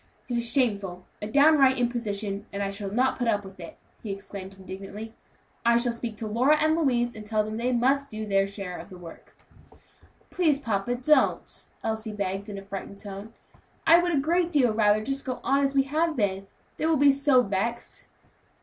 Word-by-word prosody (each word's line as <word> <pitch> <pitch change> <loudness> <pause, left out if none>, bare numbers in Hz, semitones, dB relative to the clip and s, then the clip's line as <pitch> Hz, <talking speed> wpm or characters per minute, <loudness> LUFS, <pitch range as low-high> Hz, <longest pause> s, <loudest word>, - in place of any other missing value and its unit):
It 245 - -2
is 235 0 -1
shameful! 200 -8 0 0.2
a 210 - -3
downright 280 +1 +5
imposition, 215 -4 -2
and 200 0 -3
I 195 - -2
shall 200 0 -5
not 255 +7 +1
put 245 - 0
up 205 -3 +1
with 190 -1 -12
it!" 170 - -10 0.2
he 215 - -5
exclaimed 195 -1 -8
indignantly. 195 +4 -8 0.5
"I 235 0 +4
shall 240 0 +1
speak 235 -2 -6
to 220 - -5
Lora 255 +8 +3
and 315 +1 +3
Louise, 245 -7 +1
and 215 - -8
tell 215 0 0
them 215 +1 -5
they 245 +2 0
must 270 +3 +2
do 215 0 -5
their 195 -1 +2
share 195 -3 -6
of - - -10
the 185 - -11
work." 170 -2 -13 0.9
"Please, 320 -6 +2
papa, 230 -2 -1
don't," 280 +5 +1 0.2
Elsie 220 -1 -3
begged 200 0 -3
in 200 - -6
a 195 - -8
frightened 195 0 -7
tone. 205 +2 -8 0.5
"I 330 +1 +7
would 350 0 0
a - - +3
great 340 +4 +1
deal 255 -8 +3
rather 215 0 +3
just 275 0 -1
go 255 -1 -4
on 275 +1 +2
as 275 0 0
we 270 - +5
have 315 +4 0
been; 195 -4 -1 0.3
they 315 - 0
will 320 -1 +3
be 285 +1 +6
so 275 -2 +3
vexed." 225 +4 -3
225 Hz, 200 wpm, -26 LUFS, 200-270 Hz, 0.9 s, I